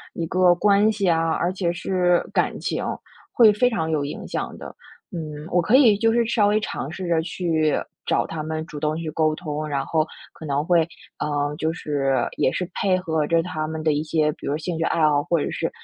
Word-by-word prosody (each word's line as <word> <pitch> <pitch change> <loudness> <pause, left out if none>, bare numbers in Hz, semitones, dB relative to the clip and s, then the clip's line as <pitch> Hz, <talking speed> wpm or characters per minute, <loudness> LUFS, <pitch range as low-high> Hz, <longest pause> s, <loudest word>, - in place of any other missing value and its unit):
一 170 - -3
个 185 0 +4
关 205 +3 +4
系 205 -2 -1
啊， 165 0 +2
而 175 +2 0
且 185 -2 -1
是 180 0 +1
感 - - 0
情， - - -2 0.5
会 225 -3 +6
非 245 +4 +3
常 160 -9 -2
有 155 -2 0
影 145 - -5
响 - - -4
的， - - -9 0.4
嗯。 155 -3 -6
我 180 - +4
可 210 +9 +4
以 225 -7 +5
就 225 +1 +3
是 235 +1 +2
稍 220 -2 +2
微 210 +1 +3
尝 180 -8 -4
试 180 +2 -6
着 170 -2 +2
去 160 -3 0 0.3
找 - - +1
他 160 -2 -5
们 155 +1 -4
主 150 - -8
动 155 +1 0
去 165 -1 -4
沟 155 -1 +1
通， 155 -3 -4
然 140 -2 -1
后 160 -1 +1 0.3
可 - - -12
能 145 0 0
会， 175 0 +4 0.4
呃， 145 0 -1
就 160 +1 -1
是 135 -6 0
也 - - +2
是 180 - -3
配 190 -2 +2
合 160 -4 -1
着 165 +2 +3
他 160 -3 -3
们 160 0 -4
的 155 - +3
一 145 +1 0
些 155 -1 +1
比 - - -10
如 - - 0
说 150 - -1
兴 165 +2 -4
趣 - - -2
爱 165 - 0
好， 145 -1 +2
或 170 - +1
者 - - -1
是 - - -2
165 Hz, 245 characters per minute, -23 LUFS, 155-185 Hz, 0.5 s, 会